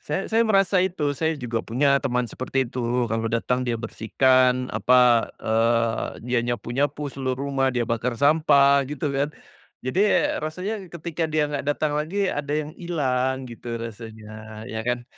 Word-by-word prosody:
say 195 - -3
saya 225 - +4
merasa 195 -2 +3
itu. 180 -3 -1
Saya 160 +2 -1
juga 120 -4 -3
punya 140 +5 +2
teman 125 -2 0
seperti 130 +3 -2
itu. 125 +1 -8 0.3
Kalau 115 0 -1
datang, 120 +2 0
dia 120 -1 0
bersihkan 125 +3 +2
apa, 120 +1 +4
eee, 115 0 0
dia 125 0 +1
nyapu 120 -1 -3
nyapu 145 +2 -1
seluruh 130 -2 -2
rumah, 135 -1 +1
dia 125 -2 0
bakar 115 +1 -2
sampah 140 -1 +5
gitu 145 0 -3
kan. 140 +1 0 0.6
Jadi 130 +9 0 0.4
rasanya 185 +7 -4
ketika 170 0 -3
dia 155 -1 +1
nggak 140 -1 -2
datang 145 +1 0
lagi, 175 +7 -1
ada 145 0 -3
yang 155 0 -3
hilang 130 -6 -1
gitu 115 0 -6
rasanya 110 -1 -9
ya 110 -1 -5
kan. 125 0 -1
130 Hz, 160 wpm, -24 LUFS, 115-150 Hz, 0.6 s, sampah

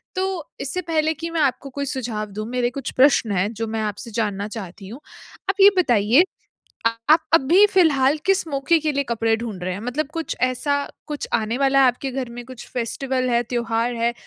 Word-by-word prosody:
तो 375 -4 -2
इससे 320 +7 -3
पहले 315 -2 0
कि 330 +2 -6
मैं 330 -1 -1
आपको 275 0 0
कोई 280 +2 -4
सुझाव 220 -6 -4
दूँ 215 +2 -5
मेरे 245 -1 0
कुछ 265 +1 -5
प्रश्न 255 -5 +4
हैं 195 +3 0
जो 225 +1 -4
मैं 220 0 -3
आपसे 210 +2 -4
जानना 205 -2 -2
चाहती 195 -2 -8
हूँ। 240 +7 -9 0.5
आप 390 0 +1
ये 400 - +10
बताइए 245 - +4 0.9
आप 315 - +7
अभी 335 +7 +6
फ़िलहाल 305 -7 +3
किस 390 -3 +2
मौके 280 +3 +2
के 305 0 0
लिए 280 0 0
कपड़े 225 -2 0
ढूँढ 220 -6 -6
रहे 185 0 -2
हैं? 195 - -6
मतलब 265 +5 -2
कुछ 330 -1 -3
ऐसा 255 +3 +1 0.3
कुछ 295 -2 -4
आने 225 +2 0
वाला 275 0 +3
है 260 - +6
आपके 255 +2 -1
घर 255 -2 -4
में 240 0 -8
कुछ 255 -2 -10
फेस्टिवल 255 +1 -2
है, 235 0 +2
त्योहार 235 0 -1
है, 235 +1 0
255 Hz, 200 wpm, -22 LUFS, 225-295 Hz, 0.9 s, ये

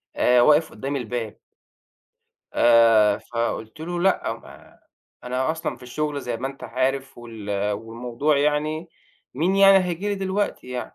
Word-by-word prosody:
آآ 125 0 +4
واقف 150 +5 +4
قدّام 140 +2 -4
الباب" 120 -4 -4 1.2
آآ 115 -3 +5
فقُلت 115 +2 -4
له 175 +2 -4
لأ، 190 +1 +1
ما - - -14 0.5
أنا 130 +3 -1
أصلًا 160 0 -4
في - - -19
الشُغل 145 +3 -3
زي 120 -3 -4
ما 130 - -4
أنت 135 - -10
عارف 130 +1 -2
وال 105 -3 -3
والموضوع 120 +7 -2
يعني، 150 +3 0 0.5
مين 180 +8 +1
يعني 195 0 +7
هييجي 180 +3 -3
لي 205 - 0
دلوقتي 195 -4 -2
يعني؟! 125 -1 -6
130 Hz, 145 wpm, -23 LUFS, 115-160 Hz, 1.2 s, يعني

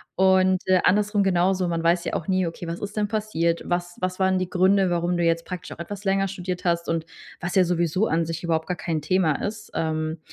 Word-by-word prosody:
Und, 190 0 +4
äh, 185 -1 +5
andersrum 205 +1 +3
genauso. 185 0 +2
Man 165 -1 -2
weiß 170 +1 +2
ja - - -3
auch 165 - -3
nie: 185 -1 +2
„Okay, 165 +1 -6
was 170 +1 -4
ist 205 0 -6
denn 210 -1 +1
passiert? 185 -6 -1
Was 175 0 -2
was 185 0 -2
waren 190 0 +3
die 185 -1 -2
Gründe, 190 +1 +3
warum 175 +1 0
du 175 - 0
jetzt 165 0 +2
praktisch 180 -2 -7
auch - - -9
etwas 200 +4 -6
länger 195 0 +2
studiert 180 -1 -5
hast 170 -1 +1
und", 165 -1 -1 0.4
was 175 +1 -3
ja 190 - +6
sowieso 175 +3 +1
an 165 +1 +1
sich 165 +1 -5
überhaupt 160 -2 0
gar 180 - -2
kein 160 -3 -2
Thema 160 -1 +1
ist. 210 0 -5
Ähm, 155 0 -2
180 Hz, 230 wpm, -24 LUFS, 170-190 Hz, 0.4 s, ja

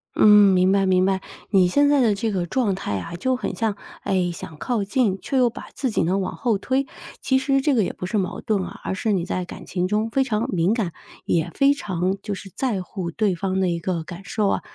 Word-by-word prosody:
嗯， - - +5 0.3
明 185 +1 +4
白 195 0 +3
明 185 -1 +3
白， 190 0 +1 0.3
你 190 -3 +4
现 285 +10 +3
在 290 -1 +4
的 230 -5 +4
这 215 +2 -1
个 180 -3 -1
状 210 +1 0
态 100 - -3
啊， 170 - -7
就 260 +9 0
很 250 - -4
像 220 -3 -1 0.3
哎， 185 -3 +1
想 160 -2 -9
靠 235 -5 -1
近， 200 -1 +1
却 270 - -2
又 250 -2 +4
把 230 - -10
自 260 - -1
己 220 - +1
呢 185 +4 +1
往 185 - -3
后 225 -6 0
推， 265 +4 0 0.3
其 265 0 +2
实 270 +1 +1
这 290 +1 +2
个 230 -5 +3
也 - - -2
不 - - -6
是 205 +3 0
矛 185 - -3
盾 205 -3 0
啊， - - -8
而 - - -2
是 215 +3 -1
你 185 -4 0
在 185 - -2
感 175 - -10
情 180 -1 -1
中 215 +3 0
非 270 +3 +2
常 225 -4 -1
敏 175 +2 +2
感， 195 -8 -2 0.3
也 165 0 +1
非 275 +1 +5
常 190 -8 -2
就 205 -2 -4
是 195 0 -10
在 225 -9 -1
乎 180 -2 -5
对 205 +2 0
方 190 +2 -2
的 190 - +2
一 170 -1 -1
个 170 -1 -2
感 175 +3 -9
受 205 0 0
啊， - - 0
195 Hz, 270 characters per minute, -23 LUFS, 180-230 Hz, 0.3 s, 嗯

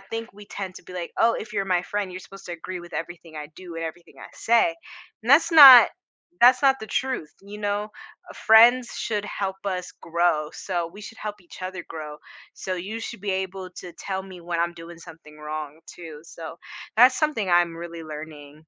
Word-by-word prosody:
think 225 +4 -7
we 205 +1 -14
tend 190 -2 -6
to - - -11
be 180 - -12
like, 175 -2 -5
"Oh, 230 0 +4
if 210 - -8
you're 200 -2 -1
my 180 -2 +1
friend, 205 +1 -3
you're 180 - -7
supposed 195 +1 -13
to 175 - -6
agree 175 +2 -7
with 175 0 -12
everything 165 -1 -7
I 150 -1 -7
do 180 -2 -10
and 165 0 -4
everything 170 +1 -9
I - - -10
say." 235 +9 +2 0.5
And 230 - -9
that's 325 +4 +5
not 270 -7 +11 0.5
that's 255 +2 +6
not 270 -1 +5
the 220 - -7
truth. 255 - -2
You 205 +1 -10
know, 205 0 -2 0.4
friends 235 +3 +6
should 210 -2 -2
help 195 -2 -3
us 180 -2 -3
grow, 170 -2 0
so 175 -3 -3
we 205 +4 -12
should 225 - -10
help 210 -1 -5
each 175 - -14
other 185 -1 -5
grow. 155 -2 -7 0.4
So 185 - -4
you 200 +6 -5
should 225 -1 -7
be 200 0 -2
able 190 0 -4
to 175 - -10
tell 190 -1 -4
me 190 -2 -11
when 170 0 -3
I'm 170 0 0
doing 170 0 -11
something 165 -2 -14
wrong 150 0 -6
too, 160 -4 -10
so 165 -1 -9 0.4
that's 250 +3 +6
something 295 - 0
I'm 175 -1 +3
really 170 0 -8
learning. 150 -1 -10
185 Hz, 205 wpm, -24 LUFS, 170-210 Hz, 0.5 s, not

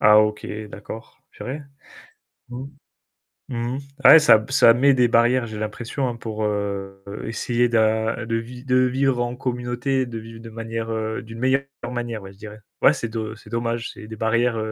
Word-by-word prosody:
Ah 105 0 +7
OK, 105 0 +1 0.2
d'accord, 105 +3 -10
purée. 140 +4 -6 0.9
Mmh. 125 +2 -6 0.8
Mmh. 120 0 -2 0.3
Ouais, 160 - +11
ça 115 -8 +6
ça 115 -3 +6
met 135 +4 +4
des 125 -2 +4
barrières, 120 +2 +3
j'ai 110 -1 -7
l'impression 115 +4 -3
pour, 110 -2 -4
heu, 100 -2 -2 0.2
essayer 120 +2 0
de 110 0 +1
de 115 0 -1
vi 120 +2 -5
de 125 -1 +2
vivre 130 0 +2
en 120 0 -2
communauté, 125 +1 -1
de 120 -2 -7
vivre 115 +1 -11
de 115 0 -10
manière, 115 0 -4
heu, 110 0 -2
d'une 115 0 -10
meilleure 130 +2 +2 0.3
manière 120 -3 -4
ouais 95 0 -11
je - - -22
dirais. 105 0 -10 0.2
Ouais, - - +7
c'est 115 - -3
do 110 -1 -4
c'est 110 - -16
dommage, 115 0 -2
c'est 105 - -11
des 110 - -7
barrières, 115 +2 +1
115 Hz, 175 wpm, -23 LUFS, 110-125 Hz, 0.9 s, Ouais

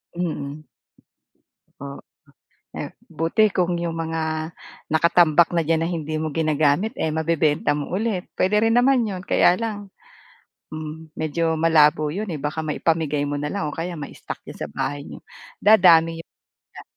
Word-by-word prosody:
Mm. 155 -4 -4 1.2
Oo, 140 0 -7 0.8
eh - - -6 0.2
buti 205 +7 +3
kung 180 -1 +1
'yong 170 -1 -2
mga 160 0 -3 0.7
nakatambak 170 0 +4
na 170 - +2
diyan 165 0 +2
na 165 - 0
hindi 155 -3 -4
mo 155 - -2
ginagamit 155 - +1
eh 160 - 0
mabebenta 155 -2 +1
mo 145 -1 -4
ulit, 200 -1 -2
pwede 190 +3 +2
rin 225 +1 +3
naman 255 0 +4
'yon, 185 -3 -5
kaya 175 - +4
lang, 205 -3 -5 0.8
hmm 155 0 -8
medyo 160 +1 -1
malabo 155 -2 +4
'yon 205 +7 -4
eh, - - -4
baka 150 +3 -4
maipamigay 150 -1 0
mo 145 - -2
na 150 - -3
lang 195 -7 -2
o - - -8
kaya 175 +1 -3
ma-stock 150 -3 -8
sa - - -5
bahay 145 0 -4
niyo, - - -10 0.4
dadami 170 -6 +6
'yong 165 - -12 0.4
ga - - -10
165 Hz, 150 wpm, -22 LUFS, 150-180 Hz, 1.2 s, dadami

